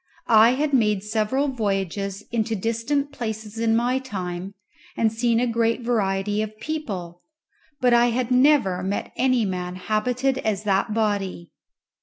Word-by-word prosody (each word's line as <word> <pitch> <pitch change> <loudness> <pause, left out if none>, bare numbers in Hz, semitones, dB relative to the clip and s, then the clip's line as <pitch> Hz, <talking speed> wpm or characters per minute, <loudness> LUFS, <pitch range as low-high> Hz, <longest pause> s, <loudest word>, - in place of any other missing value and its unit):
I 225 +1 +6
had 290 +1 -1
made 210 -6 +2
several 220 +6 0
voyages 200 -4 -2
into 225 -1 0
distant 230 +7 -1
places 220 -4 -5
in 225 -1 +2
my 245 +3 +1
time 190 -5 -5 0.4
and 225 -1 +2
seen 230 0 +1
a 250 - +2
great 230 0 0
variety 205 -3 0
of 215 0 -6
people; 195 - -5 0.6
but 250 -2 +3
I 240 0 +5
had 245 +1 -1
never 250 -8 +4
met 195 +2 -3
any 255 -3 +2
man 180 -1 -3
habited 250 +7 0
as 210 -2 -1
that 200 +1 +1
body. 200 -5 -1
220 Hz, 145 wpm, -23 LUFS, 200-245 Hz, 0.6 s, I